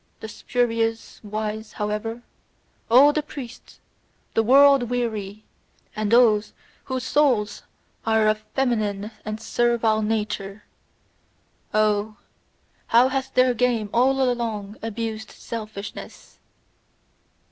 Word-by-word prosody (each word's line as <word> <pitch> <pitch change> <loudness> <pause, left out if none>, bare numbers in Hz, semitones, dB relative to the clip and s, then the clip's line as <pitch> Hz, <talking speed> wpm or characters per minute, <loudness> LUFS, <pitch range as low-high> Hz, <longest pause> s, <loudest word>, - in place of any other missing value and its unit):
The 220 - -7
spurious 230 0 -2
wise, 215 +1 -5
however, 215 +3 -4 0.7
all 270 +5 +7
the 305 - 0
priests, 255 -5 -10 0.5
the 225 - +3
world 270 +1 +5
weary, 215 -4 -3 0.5
and 215 0 -2
those 225 -3 +4 0.3
whose 260 -1 -3
souls 255 -7 +1 0.4
are 220 -1 +2
of 215 0 +2 0.2
feminine 215 -5 -1
and 215 0 -5
servile 230 -2 +1
nature 210 -2 -3 1.1
oh, 215 0 +1 0.7
how 240 +3 +5
hath 265 0 -3
their 255 0 +4
game 235 -4 0
all 265 +3 +3
along 220 -4 -3
abused 220 -1 -4
selfishness! 215 -3 -8
225 Hz, 100 wpm, -23 LUFS, 215-245 Hz, 1.1 s, all